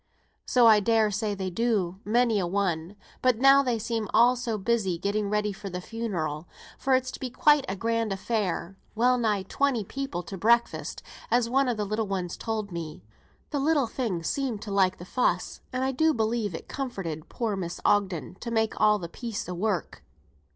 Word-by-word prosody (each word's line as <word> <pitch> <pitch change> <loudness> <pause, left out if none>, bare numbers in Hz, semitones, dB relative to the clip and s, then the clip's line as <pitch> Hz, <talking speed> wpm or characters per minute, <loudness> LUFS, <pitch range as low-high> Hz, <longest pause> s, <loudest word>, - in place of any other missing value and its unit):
"So 245 -2 +4
I 220 -2 +8
dare 220 0 +2
say 210 0 -1
they 190 -1 -3
do, 195 -4 0
many 230 -1 +2
a 180 - -1
one, 180 -1 -1 0.3
but 255 -3 +3
now 275 +3 +7
they 250 -4 0
seem 225 -1 -2
all 240 +3 +6
so 240 -3 -2
busy 195 -3 0
getting 200 +3 -1
ready 210 0 0
for 195 +1 -7
the 180 0 -4
funeral; 180 -7 -4 0.3
for 265 -1 +3
it's 260 0 0
to - - -9
be 260 - -4
quite 295 +3 +4
a 190 - -2
grand 230 +1 -1
affair, 195 -2 -2 0.2
well 250 +3 +3
nigh 210 -4 +1
twenty 250 +3 0
people 235 -5 -4
to 180 +3 -8
breakfast, 235 +3 +1 0.3
as 235 0 +2
one 270 +1 +3
of 235 - -1
the 210 - -1
little 215 +1 -1
ones 185 -3 -3
told 215 -3 -3
me; 160 - -6 0.5
the 290 - 0
little 290 -1 +2
thing 220 -7 -3
seemed 245 - -2
to 210 - -6
like 190 -2 +2
the 175 - -9
fuss, 250 +6 0
and 255 0 -1
I 265 - +1
do 315 +4 +2
believe 220 -4 0
it - - -8
comforted 190 - -5
poor 225 -4 -2
Mrs. 175 -3 -5
Ogden 185 -6 +1
to 235 - -5
make 220 -1 0
all 210 0 +5
the 175 -4 -6
piece 230 +4 -5
o' 180 - -4
work. 180 - -2
215 Hz, 195 wpm, -27 LUFS, 190-240 Hz, 0.5 s, I